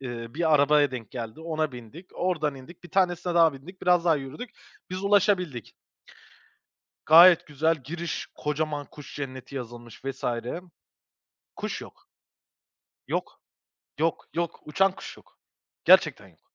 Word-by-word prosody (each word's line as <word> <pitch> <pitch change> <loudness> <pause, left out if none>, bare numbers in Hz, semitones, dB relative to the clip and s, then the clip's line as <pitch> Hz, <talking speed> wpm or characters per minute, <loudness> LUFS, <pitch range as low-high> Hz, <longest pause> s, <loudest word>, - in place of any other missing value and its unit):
Eee, 120 -3 -6
bir 160 -1 +2
arabaya 145 -1 +4
denk 120 -4 -7
geldi. 115 +3 -7
Ona 155 -3 -2
bindik. 125 - -11
Oradan 155 -6 -1
indik. 160 +7 -13
Bir - - -12
tanesine 180 -2 +1
daha 165 -2 +5
bindik. 160 +8 -13
Biraz 180 -1 +4
daha 165 -3 +4
yürüdük. 145 - -7 0.4
Biz 185 +2 -4
ulaşabildik. 190 - +1 1.3
Gayet 170 +2 +8
güzel, 155 +3 +1
giriş; 165 +5 -5
kocaman 150 -1 -2
kuş 150 - -12
cenneti 135 -1 -7
yazılmış 120 -1 -9
vs. 135 -1 -5 1.3
Kuş - - -4
yok, - - -15 1.0
yok, - - -4 0.6
yok, 165 0 0
yok. 170 0 -2
Uçan 190 +5 +2
kuş - - -10
yok. - - -21 0.5
Gerçekten - - +5
yok. - - -26
155 Hz, 130 wpm, -26 LUFS, 135-175 Hz, 1.3 s, Gayet